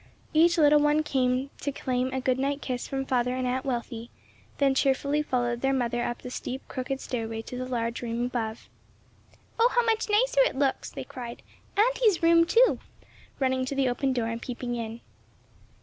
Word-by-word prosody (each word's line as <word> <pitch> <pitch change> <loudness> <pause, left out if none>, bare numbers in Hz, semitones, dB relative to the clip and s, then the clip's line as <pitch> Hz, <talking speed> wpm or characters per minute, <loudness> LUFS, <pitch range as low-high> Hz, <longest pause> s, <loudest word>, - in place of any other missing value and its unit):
Each 340 +2 +5
little 295 -1 +6
one 295 +1 +3
came 260 -1 0
to 285 - -2
claim 255 -1 -1
a 265 - -1
good 260 0 0
night 280 +1 0
kiss 250 -4 -4
from 270 0 -3
father 250 -1 +1
and 255 0 -2
Aunt 255 +1 -1
Wealthy, 235 -2 -4 0.5
then 275 -1 +3
cheerfully 280 +2 +1
followed 240 -4 -1
their 270 0 +2
mother 240 -1 0
up 240 - -4
the 250 - -6
steep 260 +1 -5
crooked 265 0 -4
stairway 225 -3 -4
to 250 - -8
the 255 0 -4
large 235 -2 -2
room 235 0 -2
above. 230 -3 -4 0.9
"Oh, 470 +2 +6
how 485 -1 +2
much 445 -1 +1
nicer - - +3
it - - +2
looks!" 270 -1 0
they - - -6
cried 250 -4 -8 0.3
"Auntie's 440 -5 +3
room 335 0 +6
too," 475 +7 +4 0.6
running 260 -1 +1
to 275 - -4
the 270 -1 +2
open 265 +2 0
door 245 -3 0
and 230 0 -4
peeping 245 -1 -4
in. 230 -1 -5
260 Hz, 185 wpm, -27 LUFS, 245-290 Hz, 0.9 s, little